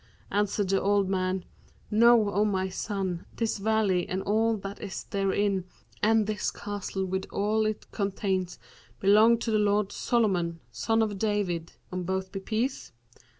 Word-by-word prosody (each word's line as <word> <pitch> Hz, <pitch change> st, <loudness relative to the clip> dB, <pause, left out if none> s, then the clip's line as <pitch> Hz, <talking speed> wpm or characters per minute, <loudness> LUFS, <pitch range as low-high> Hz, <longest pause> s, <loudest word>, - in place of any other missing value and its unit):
Answered 205 Hz, -1 st, 0 dB
the 195 Hz, 0 st, +2 dB
old 200 Hz, -1 st, +2 dB
man, 185 Hz, -1 st, -1 dB, 0.5 s
'Know, 225 Hz, -1 st, +5 dB
O 205 Hz, +1 st, +2 dB
my 190 Hz, -3 st, 0 dB
son, 185 Hz, -2 st, -3 dB
this 225 Hz, -2 st, -1 dB
valley 205 Hz, -4 st, +1 dB
and 190 Hz, +1 st, -2 dB
all 220 Hz, +2 st, +2 dB
that 195 Hz, 0 st, -7 dB
is 195 Hz, -4 st, -5 dB
therein 195 Hz, -1 st, 0 dB, 0.4 s
and 220 Hz, 0 st, +4 dB
this 215 Hz, 0 st, -1 dB
castle 200 Hz, -1 st, -4 dB
with 190 Hz, +1 st, -3 dB
all 215 Hz, +2 st, +1 dB
it 215 Hz, -1 st, -3 dB
containeth 195 Hz, -3 st, -1 dB, 0.4 s
belong 215 Hz, +4 st, +6 dB
to 230 Hz, 0 st, -3 dB
the 215 Hz, -, +3 dB
lord 205 Hz, -1 st, +2 dB
Solomon, 180 Hz, -8 st, 0 dB
son 225 Hz, 0 st, +1 dB
of 205 Hz, -3 st, -3 dB
David 190 Hz, -6 st, -1 dB, 0.2 s
(on 185 Hz, 0 st, -3 dB
both 190 Hz, +1 st, -2 dB
be 195 Hz, -, -4 dB
peace!). 230 Hz, +7 st, -2 dB
200 Hz, 150 wpm, -28 LUFS, 190-215 Hz, 0.5 s, belong